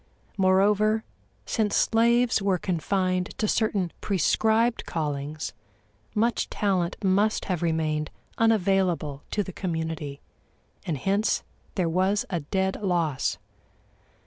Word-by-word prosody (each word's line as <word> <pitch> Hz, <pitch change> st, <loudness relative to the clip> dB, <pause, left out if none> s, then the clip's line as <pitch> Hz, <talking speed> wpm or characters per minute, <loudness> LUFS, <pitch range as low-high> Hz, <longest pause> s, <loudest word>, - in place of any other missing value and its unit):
Moreover, 205 Hz, +3 st, +3 dB, 0.4 s
since 215 Hz, -3 st, 0 dB
slaves 235 Hz, 0 st, +3 dB
were 195 Hz, -2 st, +2 dB
confined 185 Hz, +1 st, -1 dB
to 215 Hz, -, 0 dB
certain 205 Hz, -6 st, +1 dB
prescribed 220 Hz, +5 st, +2 dB
callings, 150 Hz, -1 st, -3 dB, 0.6 s
much 230 Hz, +3 st, +1 dB
talent 185 Hz, -4 st, 0 dB
must 200 Hz, +3 st, +2 dB
have 180 Hz, -4 st, -2 dB
remained 155 Hz, -2 st, 0 dB, 0.3 s
unavailable 190 Hz, -9 st, +1 dB
to 205 Hz, -, 0 dB
the 190 Hz, -, -8 dB
community, 160 Hz, -5 st, -3 dB, 0.7 s
and 160 Hz, -4 st, -1 dB
hence 200 Hz, -, +1 dB, 0.3 s
there 180 Hz, -4 st, +1 dB
was 185 Hz, +4 st, +1 dB
a 175 Hz, -, 0 dB
dead 190 Hz, +7 st, -1 dB
loss. 170 Hz, -8 st, 0 dB
190 Hz, 105 wpm, -26 LUFS, 165-210 Hz, 0.7 s, Moreover